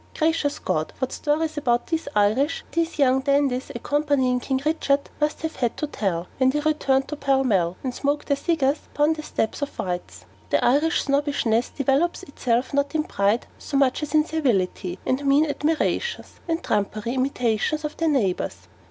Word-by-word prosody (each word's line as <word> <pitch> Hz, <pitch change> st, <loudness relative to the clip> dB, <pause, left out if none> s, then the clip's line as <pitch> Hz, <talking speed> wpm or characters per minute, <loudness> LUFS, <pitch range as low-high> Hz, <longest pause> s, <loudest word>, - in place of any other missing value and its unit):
'Gwacious 315 Hz, -2 st, +1 dB
Gad' 155 Hz, 0 st, -2 dB
what 260 Hz, -, -2 dB
stories 310 Hz, +1 st, -1 dB
about 240 Hz, -4 st, +1 dB
'the 325 Hz, -2 st, 0 dB, 0.2 s
Iwish' 220 Hz, +10 st, +2 dB
these 335 Hz, -1 st, -1 dB
young 265 Hz, -2 st, +4 dB
dandies 275 Hz, -2 st, +1 dB
accompanying 275 Hz, -1 st, +1 dB
King 265 Hz, +1 st, -1 dB
Richard 285 Hz, -3 st, +1 dB
must 300 Hz, +1 st, -1 dB
have 320 Hz, 0 st, -3 dB
had 240 Hz, -3 st, -1 dB
to -, -, -1 dB
tell, 190 Hz, -, -2 dB
when 260 Hz, 0 st, +5 dB
they 295 Hz, +3 st, +1 dB
returned 285 Hz, -3 st, +1 dB
to 300 Hz, -, -3 dB
Pall 270 Hz, -2 st, +2 dB
Mall, 185 Hz, -8 st, +1 dB
and 255 Hz, -2 st, -2 dB
smoked 285 Hz, +3 st, -1 dB
their 280 Hz, -, +2 dB
cigars 290 Hz, -1 st, +1 dB, 0.2 s
upon 295 Hz, +2 st, +3 dB
the 310 Hz, -, -6 dB
steps 225 Hz, -5 st, -2 dB
of 285 Hz, -, -1 dB
'White's.' 180 Hz, -1 st, -4 dB, 0.2 s
The -, -, +2 dB
Irish 295 Hz, +7 st, +3 dB
snobbishness 275 Hz, -5 st, +1 dB
developes 280 Hz, +5 st, 0 dB
itself 250 Hz, -2 st, -1 dB
not 280 Hz, +2 st, 0 dB
in 310 Hz, -, +2 dB
pride 205 Hz, -2 st, +1 dB
so 280 Hz, -, -2 dB
much 275 Hz, 0 st, +2 dB
as 300 Hz, +1 st, -3 dB
in 305 Hz, 0 st, +5 dB
servility 195 Hz, -, 0 dB
and 265 Hz, +2 st, 0 dB
mean 280 Hz, +2 st, +4 dB
admirations, 320 Hz, +10 st, -1 dB
and 330 Hz, 0 st, -1 dB
trumpery 215 Hz, +3 st, -1 dB
imitations 260 Hz, +2 st, 0 dB
of 300 Hz, -, -4 dB
their 330 Hz, -1 st, +1 dB
neighbours. 200 Hz, -, 0 dB
280 Hz, 175 wpm, -24 LUFS, 245-300 Hz, 0.2 s, when